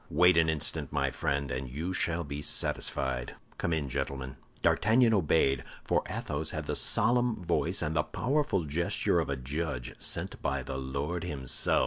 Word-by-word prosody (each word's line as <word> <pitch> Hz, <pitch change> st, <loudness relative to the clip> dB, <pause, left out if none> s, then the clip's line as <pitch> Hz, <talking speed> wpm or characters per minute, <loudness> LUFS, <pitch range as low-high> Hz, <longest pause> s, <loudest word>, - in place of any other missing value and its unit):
Wait 90 Hz, +3 st, +5 dB
an 80 Hz, -1 st, +4 dB
instant, 80 Hz, -2 st, 0 dB
my -, -, 0 dB
friend, 70 Hz, -1 st, -1 dB
and 65 Hz, 0 st, -3 dB
you 80 Hz, +9 st, -3 dB
shall 85 Hz, -1 st, +1 dB
be 70 Hz, -1 st, -5 dB
satisfied. 60 Hz, -3 st, -1 dB, 0.2 s
Come 85 Hz, -, -1 dB
in, 80 Hz, -4 st, 0 dB
gentlemen." 65 Hz, 0 st, -3 dB, 0.3 s
D'Artagnan 115 Hz, +2 st, +4 dB
obeyed; 75 Hz, -, +3 dB, 0.2 s
for -, -, +2 dB
Athos 75 Hz, +1 st, -3 dB
had -, -, -4 dB
the -, -, -2 dB
solemn 120 Hz, -3 st, +2 dB
voice 85 Hz, +1 st, +1 dB
and 75 Hz, +1 st, -2 dB
the 75 Hz, -, +4 dB
powerful 100 Hz, -, 0 dB
gesture 80 Hz, +4 st, +1 dB
of -, -, -1 dB
a 70 Hz, -, 0 dB
judge 65 Hz, -1 st, -3 dB
sent -, -, -1 dB
by 70 Hz, -1 st, -1 dB
the 65 Hz, +1 st, -4 dB
Lord 70 Hz, +6 st, -3 dB
himself. 70 Hz, -7 st, +1 dB
75 Hz, 165 wpm, -30 LUFS, 70-90 Hz, 0.3 s, Wait